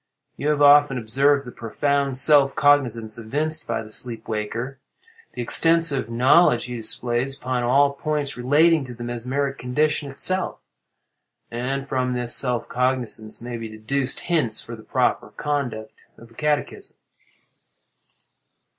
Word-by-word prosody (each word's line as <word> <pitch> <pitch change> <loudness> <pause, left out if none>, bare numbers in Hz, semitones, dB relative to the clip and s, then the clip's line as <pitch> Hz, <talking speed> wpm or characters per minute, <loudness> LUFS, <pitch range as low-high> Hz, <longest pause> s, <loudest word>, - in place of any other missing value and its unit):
You 145 - -4
have 150 -1 +2
often 145 -2 +6
observed 135 +5 +1
the 125 - -9
profound 140 +4 -2
self 140 0 +5
cognizance 120 -7 +1
evinced 150 +8 -3
by - - -2
the 110 - -12
sleep 115 -1 -2
waker—the 130 - -8
extensive 165 0 +3
knowledge 125 +3 +3
he 125 0 -6
displays 120 +3 0
upon 130 -2 -2
all 140 +4 +3
points 145 -2 -3
relating 150 +5 +3
to 125 -1 -10
the 120 - -8
mesmeric 130 +4 -3
condition 145 +3 -1
itself; 185 +7 -1 0.9
and 135 +3 -4
from 130 -2 -1
this 120 -1 0
self 125 -3 +1
cognizance 125 -4 -2
may 120 0 -6
be 115 -1 -7
deduced 130 +5 -3
hints 150 -11 -1
for 115 - -7
the 110 - -13
proper - - -1
conduct 120 -7 -3 0.3
of 115 0 -16
a - - -18
catechism." 150 +4 -3
130 Hz, 135 wpm, -22 LUFS, 120-145 Hz, 0.9 s, often